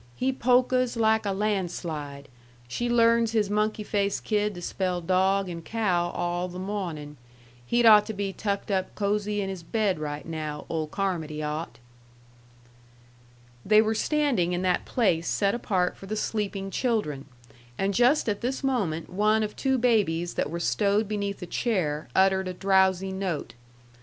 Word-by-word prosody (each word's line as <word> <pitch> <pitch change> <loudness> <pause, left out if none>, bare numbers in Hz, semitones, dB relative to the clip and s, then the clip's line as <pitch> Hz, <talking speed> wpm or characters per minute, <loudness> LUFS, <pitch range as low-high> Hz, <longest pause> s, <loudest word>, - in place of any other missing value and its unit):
"He 265 +1 0
polkas 255 0 +2
like 220 -1 +2
a - - +1
landslide. 170 -8 -3 0.4
She 240 - -2
learns 230 -1 +3
his 210 -3 +1
monkey 210 +1 0
faced 200 -1 -1
kid 210 -2 0
to 175 - -7
spell 180 -1 -1
dog 190 +3 +2
and 170 -2 -6
cow 180 -5 0
all 175 +1 -2
the 180 0 -8
mawnin'. 175 -7 -5 0.5
He'd 240 0 +2
ought 210 -2 +8
to 220 - -3
be 195 -1 -3
tucked 200 0 -3
up 190 -1 -1
cosey 210 0 0
in 195 - -3
his 190 -2 -5
bed 195 0 0
right 145 -1 -5
now, 155 -2 -5
old 160 -2 -2
Carmody 160 -5 -2
ought." 150 +2 -4 1.9
They 215 +1 +5
were 220 0 +3
standing 245 - +1
in 175 +1 -1
that 180 -1 +1
place 180 -9 +1
set 200 -1 +1
apart 185 -6 0
for 195 - -12
the 215 - -3
sleeping 200 -2 -2
children; 200 - -1 0.5
and 195 +1 0
just 245 +7 +3
at 205 -2 -1
this 260 +3 -2
moment 195 - -1
one 215 +3 +2
of 210 - -4
two 265 -1 +1
babies 200 -9 +1
that - - -1
were 170 +2 -4
stowed 200 - +1
beneath 200 -2 -3
a - - -4
chair 170 -7 -1
uttered 190 0 +3
a 185 - -4
drowsy 190 0 +2
note. 190 -5 -3
195 Hz, 160 wpm, -26 LUFS, 175-215 Hz, 1.9 s, ought